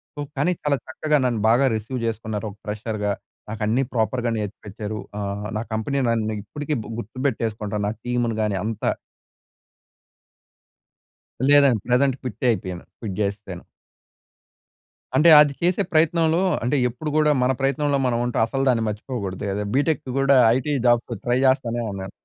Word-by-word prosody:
So, - - -9 0.2
కానీ 145 +6 +2
చాలా 145 -1 +2
చక్కగా 150 +3 0
నన్ను 120 -4 0
బాగా 120 +4 +4
రిసీవ్ 110 +4 -4
చేసుకున్నారు 110 -1 -3
ఒక 100 - -17
ఫ్రెషర్‌‌గా. 105 -1 -2 0.4
నాకు 110 +1 -6
అన్ని 120 +5 +2
ప్రాపర్ర్‌గా 120 +1 0
నేర్చిపిచ్చరు. 105 +1 -5 0.2
ఆహ్, 100 +1 -3
నా 110 - -2
కంపెనీ 110 +6 -1
నన్ను 110 -2 0
ఇప్పటికి 145 +7 -4 0.2
గుర్తుపెట్టేసుకుంటా 110 -3 -3
నా - - 0
టీమ్‌ని 120 -2 0
గాని 105 -2 0
అంతా. 110 -1 -1 2.6
లేదండి. 140 -6 +6
ప్రెజెంట్ 130 +2 +3
క్విట్టే 125 -1 -3
అయిపోయాను. 90 -4 -5
క్విట్ 100 -5 -5
చేసేసాను. 100 -3 -3 1.5
అంటే, 170 - +5
అది 145 -1 +4
చేసే 180 +3 +2
ప్రయత్నంలో 165 +1 +3 0.2
అంటే 125 +5 +1
ఎప్పుడు 125 +6 -5
గూడా 150 -1 +4
మన 125 +1 +3
ప్రయత్నంలో 140 +1 +1
మనం 120 -2 +1
ఉంటే 120 - -2
అసలు 135 +4 -2
దాన్ని 115 -3 +2
మర్చిపోకూడదు 105 -3 -4
కదా! 105 +1 -2
బీటెక్ 145 +3 +1 0.2
గూడా 135 0 +4 0.2
ఐటీ 140 +3 -1
జాబ్స్ 120 0 +2
ట్రై 120 +1 +2
చేస్తానే 120 -3 +1
ఉన్నాను. 95 -1 -6
120 Hz, 140 wpm, -23 LUFS, 105-140 Hz, 2.6 s, లేదండి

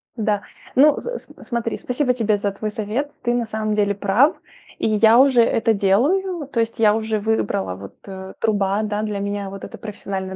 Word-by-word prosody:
Да, 210 -3 0 0.3
ну 290 +2 +6
с - - -6
с - - -6
смотри. 235 -2 -2
Спасибо 250 0 0
тебе 220 -4 +1
за 200 0 -1
твой 215 +2 -4
совет. 220 +7 -3
Ты 240 - +1
на 240 -1 0
самом 215 0 -2
деле 205 -1 +1
прав, 210 - +3 0.4
и - - 0
я 220 +1 +5
уже 260 -2 +6
это 225 -1 +2
делаю, 290 - +1
то 260 -4 -3
есть 230 +1 0
я 215 -2 +5
уже 220 -1 -1
выбрала 200 - -1
вот, 100 +1 -11
э, 190 -1 -8
труба, 205 -1 +1
да, 210 0 -2
для 210 -2 -3
меня 200 0 -3
вот 195 0 -9
это - - -8
профессиональное 195 -3 -5
215 Hz, 195 wpm, -21 LUFS, 200-240 Hz, 0.4 s, ну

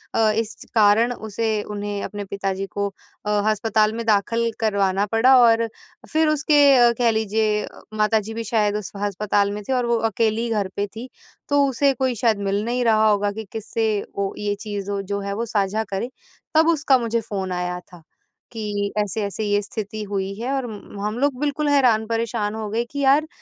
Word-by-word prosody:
अ, 220 -1 +4
इस 225 0 -2 0.2
कारण 220 +3 +4
उसे 220 -1 -2
उन्हें 205 -1 -4
अपने 205 -1 -5
पिताजी 195 0 -3
को 200 +1 -2 0.4
अ, - - -2 0.2
अस्पताल 215 0 +1
में 230 0 -4
दाखिल 230 +2 +1
करवाना 200 -2 +1
पड़ा 245 +4 +5
और 230 -1 +4 0.4
फिर 315 0 +3
उसके 285 -5 +5
कह 235 -1 +4
लीजिए 215 -1 0 0.3
माता-जी 215 0 +1
भी 230 +1 -4
शायद 210 -2 +1
उस 210 - -6
अस्पताल 200 0 0
में 205 +1 -5
थे 265 - 0
और 250 -1 +1
वो 235 0 +2
अकेली 225 +2 0
घर 210 -3 0
पे 205 0 -1
थी, 225 +5 -9 0.4
तो 285 0 +4
उसे 275 +1 +2
कोई 260 -1 -1
शायद 225 -1 +2
मिल 200 +1 0
नहीं 245 +1 0
रहा 220 -1 +4
होगा 205 -1 +2
कि 220 +2 -6
किससे 225 +1 -2 0.3
वो 200 -1 -1
ये 205 -1 -1
चीज़ 205 -2 -4
वो 200 -1 -1
जो 200 +1 -3
है 200 0 -3
वो 230 +3 -2
साझा 210 0 0
करे, 195 +5 -2 0.5
तब 320 +1 +5
उसका 290 -5 +3
मुझे 230 -1 -1
फ़ोन 195 -3 -4
आया 180 0 -2
था 175 -1 -16 0.5
कि 205 -3 -3
ऐसे-ऐसे 210 +1 -2
ये 205 0 +1
स्थिति 215 +1 -6
हुई 195 -1 -2
है 245 +3 -2
और 270 -2 -1
म 205 -2 -9
हम 215 +2 -2
लोग 275 -2 +1
बिल्कुल 295 +1 -1
हैरान 245 -6 +4
परेशान 225 -2 -1
हो 220 -1 -4
गए 225 +3 0
कि 285 - -5
यार, 280 +3 +4
220 Hz, 190 wpm, -22 LUFS, 205-235 Hz, 0.5 s, पड़ा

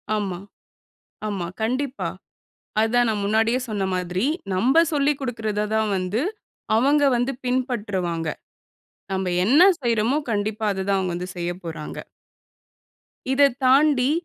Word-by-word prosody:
ஆமா 195 -4 -2 0.9
ஆமா, 195 -5 -3 0.2
கண்டிப்பா. 260 +4 -1 0.7
அதுதான் 240 +2 +3
நான் 210 -2 -1
முன்னாடியே 225 +4 +2
சொன்ன 205 -3 -1
மாதிரி, 180 +2 -1 0.3
நம்ப 260 - +4
சொல்லிக் 290 -1 +2
குடுக்கிறத 220 -5 -2
தான் 220 -1 +1
வந்து 185 +6 -1 0.5
அவங்க 285 +5 +3
வந்து 245 +3 0
பின்பற்றுவாங்க. 205 - -1 0.8
நம்ப 190 -1 -1 0.2
என்ன 275 - +5 0.2
செய்றோமோ 235 +3 +1
கண்டிப்பா, 215 +1 -1
அத 190 -1 -3
தான் 200 - +3
அவுங்க 185 -2 -2
வந்து 180 +1 -5
செய்யப்போறாங்க. 170 -3 -5 1.4
இதைத் 275 -2 +4
தாண்டி, 270 0 +4
220 Hz, 115 wpm, -23 LUFS, 190-255 Hz, 1.4 s, என்ன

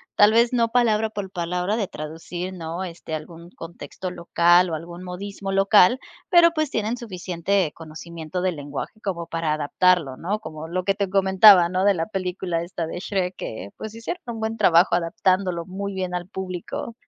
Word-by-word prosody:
tal 205 0 +6
vez 235 +2 +3
no 230 -2 +2
palabra 225 -2 +2
por 205 -3 -5
palabra 180 +2 -2
de 205 -4 -2
traducir, 165 +4 -6
¿no?, 170 +1 -5
este 165 -2 -8
algún 170 +2 -9
contexto 170 +2 -8
local, 175 +1 +3
o 160 - -2
algún 170 +3 -8
modismo 195 +2 -6
local, 195 +5 +5 0.3
pero, 345 -3 +7
pues, 310 -3 -1
tienen 220 +2 -1
suficiente 185 - -2
conocimiento 165 +1 -7
del 185 -2 0
lenguaje 145 +8 -7
como 170 -4 -3
para 165 -2 -2
adaptarlo, 155 0 +2
¿no?, 195 +9 -3
como 160 -6 -8
lo 180 +1 -2
que 195 - +3
te 200 -2 -1
comentaba, 190 -1 +7
¿no?, 185 +2 -1
de 200 -2 +4
la 165 - -1
película 180 -3 -3
esta 170 -2 -4
de 175 - -5
Shrek 185 -2 -2
que, 100 -3 -6
pues, 220 0 -7
hicieron 230 +11 -6
un 235 -2 -5
buen 220 0 -2
trabajo, 175 -3 +4
adaptándolo 185 -1 0
muy 200 +2 -5
bien 185 -1 -3
al 175 0 -4
público. 190 +4 -5
185 Hz, 180 wpm, -23 LUFS, 170-205 Hz, 0.3 s, pero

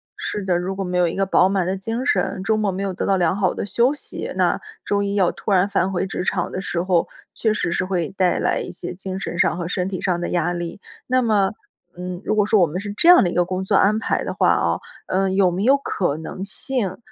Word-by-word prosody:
是 205 - -4
的， 180 -2 +2
如 185 +2 -3
果 195 - -3
没 180 0 -2
有 180 -1 +3
一 - - -3
个 195 - +1
饱 190 0 +4
满 190 -3 +1
的 185 - -1
精 225 +6 -3
神， 190 -3 0
周 220 +2 +2
末 210 -2 0
没 190 +2 -4
有 195 -1 -2
得 - - -3
到 195 -1 +2
良 175 0 +2
好 195 -2 +1
的 - - -4
休 235 +7 +2
息， 290 - -6
那 - - +2 0.3
周 200 0 +1
一 200 0 -2
要 190 -3 +3
突 175 +4 -5
然 190 +1 +4
返 195 -2 0
回 190 0 -1
职 180 - -3
场 180 -2 -1
的 185 - -4
时 170 -1 -2
候， 180 -2 +1 0.3
确 220 -2 0
实 175 -5 -1
是 185 - 0
会 180 -4 -1
带 185 -2 +1
来 - - +1
一 - - -5
些 175 0 -6
精 190 +1 -6
神 175 -2 -5
上 170 - +2
和 170 -1 -3
身 180 +1 -2
体 185 - -4
上 175 -2 0
的 - - -2
压 175 0 0
力。 175 +2 -5 0.3
那 255 0 +3
么， 205 -4 +2 0.5
嗯， 180 +1 -5
如 215 - 0
果 210 -1 +3
说 210 -1 +3
我 170 - +5
们 175 +5 -4
是 205 0 -5
这 335 +11 +3
样 355 - +9
的 175 - +1
一 - - -4
个 175 - +3
工 185 +1 -3
作 200 - +1
安 210 +3 +4
排 - - -1
的 - - -3
话 - - +3
哦， - - 0 0.3
呃， 190 0 +1
有 190 -2 +3
没 190 +4 -2
有 270 +4 +5
可 180 - -1
能 185 +4 -6
性 210 -3 -1
190 Hz, 290 characters per minute, -21 LUFS, 180-200 Hz, 0.5 s, 样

